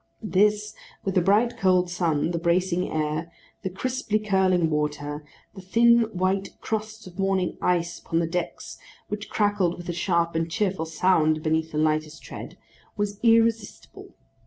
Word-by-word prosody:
This, 210 +1 +2 0.3
with 195 - -1
the 185 - +3
bright 215 +6 +2
cold 185 -2 +3
sun, 165 -3 0
the 170 - -2
bracing 180 +1 +1
air, 155 +2 -2 0.3
the 190 - -3
crisply 220 +3 -1
curling 190 -5 +2
water, 150 0 -2 0.3
the 195 - -10
thin 235 +4 +4
white 190 +1 -1
crust 220 0 -4
of 185 +1 -12
morning 195 -2 0
ice 170 -1 0
upon 165 - -3
the 165 - +2
decks 175 +2 -4 0.3
which 210 +1 -5
crackled 205 -4 +1
with 175 0 -8
a - - -1
sharp 170 -1 0
and 165 0 -1
cheerful 185 -2 -1
sound 155 -2 +2
beneath 160 0 0
the 150 - -4
lightest 155 0 0
tread, - - -9 0.4
was 205 0 -2
irresistible. 225 -2 +1
185 Hz, 155 wpm, -25 LUFS, 165-205 Hz, 0.4 s, thin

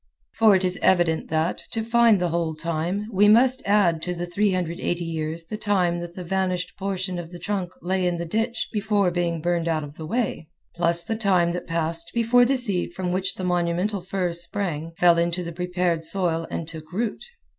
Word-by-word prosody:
For 220 -3 +5
it 190 0 +1
is 180 0 -1
evident 175 -3 +2
that, 160 +2 0
to 225 - -1
find 230 -2 +4
the 175 -1 0
whole 165 -1 -1
time, 170 +6 -2
we 205 +2 +5
must 255 +5 +5
add 190 -6 +3
to 180 +1 -2
the 175 0 -3
380 175 -2 -1
years 160 0 -3
the 215 - -5
time 185 -5 +1
that 175 0 -7
the 185 - -6
vanished 185 -1 -1
portion 190 -2 -3
of 165 -1 -7
the 175 - -8
trunk 190 -1 -3
lay 185 0 0
in 175 -1 -1
the 170 - -4
ditch 225 +6 -2
before 205 -3 +1
being 170 -2 -1
burned 170 0 0
out 160 -2 0
of 145 +1 -10
the 160 - -7
way, 205 -7 -2 0.2
plus 170 0 +3
the 225 - -2
time 185 -6 +2
that 180 - -5
passed 165 0 -2
before 235 +1 +4
the 270 +2 +2
seed 195 -8 0
from 180 -1 -2
which 185 +1 +1
the 185 - -6
monumental 180 +3 0
fir 180 -1 -2
sprang 170 -2 -3
fell 170 -1 +5
into 170 +1 0
the 170 0 -6
prepared 180 -1 -1
soil 165 -1 0
and 165 - -4
took 160 -1 -9
root. 215 +4 -2
180 Hz, 200 wpm, -24 LUFS, 170-200 Hz, 0.2 s, For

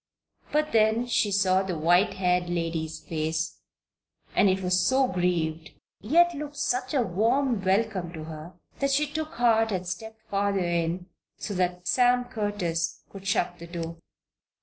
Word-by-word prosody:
But 305 0 +1
then 220 +2 +3
she 220 -3 +1
saw 190 -1 +3
the 190 -3 -3
white 175 +6 +3
haired 180 -1 +1
lady's 165 -2 -2
face, 160 0 -3 0.8
and 200 - +5
it 190 0 0
was 180 0 +2
so 260 +6 +3
grieved, 170 -4 -1 0.3
yet 345 +10 +4
looked 295 -1 -6
such 255 0 -1
a 260 - +3
warm 225 +4 +1
welcome 190 -2 0
to 160 -2 -7
her, 155 +2 -9 0.3
that 275 - +1
she 280 +2 +2
took 310 +1 -5
heart 225 -2 +3
and 185 -2 -2
stepped 220 +5 -7
farther 200 0 0
in, 170 +1 -1 0.3
so 205 - -5
that 180 -1 -1
Sam 245 0 +3
Curtis 205 -8 -2
could 195 -1 -9
shut 175 -3 0
the 170 - -9
door. 165 -1 -5
190 Hz, 155 wpm, -27 LUFS, 175-230 Hz, 0.8 s, and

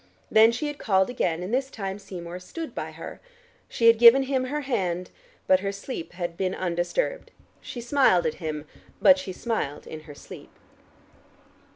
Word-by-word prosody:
Then 220 +1 +7
she 240 +6 -3
had 295 -1 -4
called 190 +1 +2
again, 175 -8 -1
and 190 +6 -5
this 265 +1 0
time 195 -4 -5
Seymour 180 -3 -8
stood 320 - -7
by - - -4
her. - - -9 0.5
She 230 - -1
had 230 -1 +7
given 240 +3 +8
him 265 -1 -1
her 295 +3 -3
hand, 185 -10 -2 0.3
but 185 - +4
her 195 +1 -2
sleep 200 -3 -7
had 175 -2 -4
been 185 +1 -1
undisturbed. 185 - -2 0.3
She 240 - -7
smiled 240 - +3
at 160 - 0
him, 155 -2 -4 0.3
but 280 0 +6
she 280 - -6
smiled 185 - -3
in 155 - -8
her 145 - -9
sleep. - - -12
200 Hz, 175 wpm, -26 LUFS, 175-255 Hz, 0.5 s, given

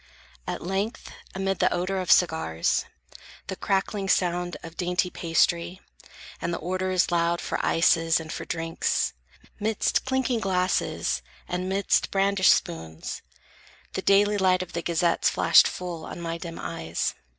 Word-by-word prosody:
At - - -4
length, 195 +5 -3 0.2
amid 195 0 -1
the - - +3
odor 185 +2 -1
of 180 - 0
cigars, 160 - +2 0.6
The 190 - -5
crackling 195 0 -1
sound 175 -1 +1
of 165 0 -9
dainty 180 +1 0
pastry, 170 +2 +1 0.6
and - - -2
The 170 - -2
orders 185 +1 0
loud 170 0 +1
for - - -3
ices 165 0 +3
and 160 -1 -7
for - - -5
drinks, 165 0 -1 0.5
'Midst 215 0 +1
clinking 260 -2 0
glasses, 180 - 0 0.3
and 180 +1 -3
'midst 195 +1 +1
brandished 195 -1 +4
spoons, 80 -1 -5 0.7
The - - -2
daily 205 +1 +4
light 185 -1 +3
of 180 - -13
the 170 - -2
gazettes 170 0 +2
flashed - - +6
full 175 -3 -5
On - - -8
my 170 0 -4
dim 165 -1 -7
eyes. 80 +1 -3
180 Hz, 140 wpm, -26 LUFS, 165-195 Hz, 0.7 s, flashed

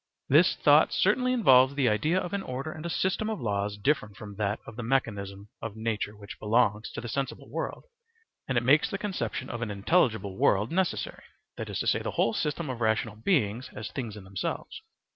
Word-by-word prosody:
This - - +5
thought - - +5
certainly 255 0 +2
involves 135 - +5
the 135 -3 +2
idea 155 +12 +2
of 180 +1 -5
an 200 - -1
order 135 0 -4
and 155 - -8
a - - -4
system 190 +5 0
of 220 - -3
laws 105 -1 -1
different 105 -3 0
from 105 -1 -9
that 105 0 -1
of 115 - -10
the 120 - -5
mechanism 105 -5 -2
of 115 -2 -5
nature 110 -2 -3
which 100 0 -10
belongs 110 -1 +2
to - - -5
the 120 - -6
sensible 135 +3 -4
world; - - -4 0.6
and 130 - 0
it 120 - +2
makes 145 +5 +4
the 195 - -3
conception 190 - -3
of 120 - -5
an 115 - -2
intelligible 105 - +1
world 105 +3 +3
necessary 185 +1 -1 0.3
(that - - -6
is - - -3
to - - -3
say, - - +2
the - - -3
whole 115 - +3
system 150 +1 -2
of 125 -2 -5
rational 110 -1 +1
beings 115 - 0
as 105 0 -6
things 115 -6 -5
in 105 - -10
themselves). 95 0 -5
115 Hz, 205 wpm, -28 LUFS, 105-145 Hz, 0.6 s, This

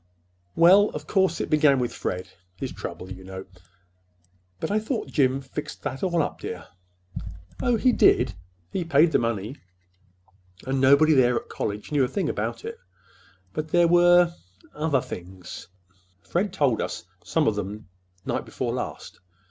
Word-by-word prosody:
"Well, 190 +5 +6
of - - -5
course, 190 -4 +1
it - - -2
began 150 -2 +5
with 125 -2 -1
Fred—his 90 0 -6
trouble, 95 +1 -7
you 95 0 -8
know." 95 0 -8 1.1
"But - - -3
I 210 - +2
thought 220 +2 -3
Jim 135 -2 +2
fixed 135 +2 -7
that 135 -2 -4
all 175 -4 +1
up, 145 - -5
dear." 90 - -6 0.9
"Oh, 245 -2 +2
he 255 +3 +4
did. 120 - +4 0.4
He 185 - -1
paid 160 0 +4
the - - +3
money, 115 +2 -2 1.1
and 130 0 0
nobody 140 +4 +6
there 125 -3 +4
at - - -4
college 105 +5 -4
knew 145 -2 +3
a - - +2
thing 180 +1 -2
about 110 +3 -3
it. - - -6 0.7
But 155 0 -3
there 175 +2 +4
were—other 170 - +2
things. 90 0 -9 0.6
Fred 190 +3 -1
told 140 - +1
us - - -4 0.2
some - - +1
of 110 - +3
them 105 +1 -5 0.4
night - - -1
before - - -3
last. - - -6
140 Hz, 150 wpm, -25 LUFS, 105-170 Hz, 1.1 s, Well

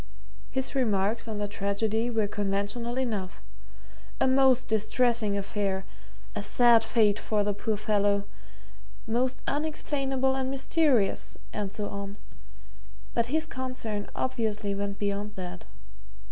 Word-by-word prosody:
His 265 0 -1
remarks 220 -3 +1
on 220 -2 -3
the 205 0 -1
tragedy 205 +3 0
were 225 -3 +1
conventional 205 +4 -2
enough 215 -8 -2 0.8
a - - +4
most 260 -1 +4
distressing 220 0 +2
affair 195 -1 -1 0.5
a 210 - -1
sad 235 +2 +5
fate 220 -3 +3
for 210 -1 +1
the 205 0 0
poor 210 +1 -1
fellow 205 -1 +2 0.8
most 250 +3 0
unexplainable 275 -3 0
and 265 -1 -1
mysterious, 270 -5 +2 0.2
and 205 -2 -2
so 210 0 -3
on 200 0 -6 1.0
but 235 0 +1
his 315 +5 +1
concern 255 -7 -4
obviously 220 -5 -1
went 200 0 -3
beyond 205 0 -2
that. 180 -1 -6
220 Hz, 120 wpm, -28 LUFS, 205-255 Hz, 1.0 s, sad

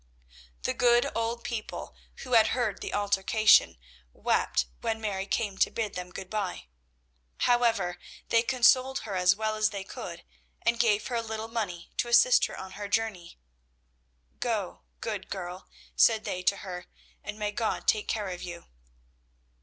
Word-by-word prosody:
The - - 0
good 240 -1 +3
old 230 +1 -2
people, 230 -3 -5 0.3
who 250 - -5
had 225 -2 +7
heard 235 -5 -1
the - - -4
altercation, 205 - +4 0.4
wept - - +1
when 220 0 -2
Mary 200 -3 -3
came 200 -2 -1
to - - +4
bid 220 -3 -3
them 180 0 -6
good 190 +1 -8
bye. 200 - -3 0.8
However, 230 -7 +2 0.3
they 230 - +5
consoled 255 +2 +3
her 215 -3 -5
as 180 +1 +4
well 215 +1 -1
as 215 0 +2
they 200 -2 -5
could, - - -8 0.4
and 235 0 +2
gave 215 -3 +3
her 245 - -3
a - - 0
little 220 0 -5
money 200 -7 -4
to - - 0
assist - - +6
her - - -9
on 190 0 -8
her 205 +1 -6
journey. 200 -4 -2 1.0
"Go, - - -2 0.2
good - - -4
girl," 180 -1 -6 0.3
said 220 -2 +5
they 180 - -3
to 200 +2 +2
her, 180 -1 -6 0.4
"and 210 - -6
may 210 -1 -2
God 220 +1 -2
take 215 -1 +2
care 210 -3 -2
of 180 -1 -6
you." 175 -1 -7
215 Hz, 160 wpm, -28 LUFS, 190-230 Hz, 1.0 s, had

